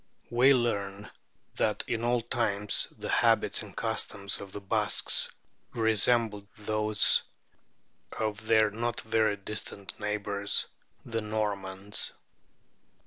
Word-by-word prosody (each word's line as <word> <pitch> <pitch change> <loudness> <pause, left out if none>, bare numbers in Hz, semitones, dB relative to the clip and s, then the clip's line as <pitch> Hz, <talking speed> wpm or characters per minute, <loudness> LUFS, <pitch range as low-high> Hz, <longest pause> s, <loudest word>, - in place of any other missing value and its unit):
We 125 +3 +5
learn 100 -4 -2 0.5
that 105 -1 +1
in 115 0 -2
old 120 -1 0
times 105 -4 +1
the - - -5
habits - - +3
and - - -11
customs 100 -1 -1
of 100 -1 -9
the 105 - -6
Basques 100 -1 +3 0.5
resembled 110 -2 +2
those 105 0 +3 0.9
of 110 0 -3
their 110 -2 +4
not 120 +2 -2
very 110 -2 +1
distant 100 -1 -7
neighbours, 100 -1 -1 0.4
the 115 -1 -2
Normans. 100 -2 -3
105 Hz, 105 wpm, -29 LUFS, 100-115 Hz, 0.9 s, We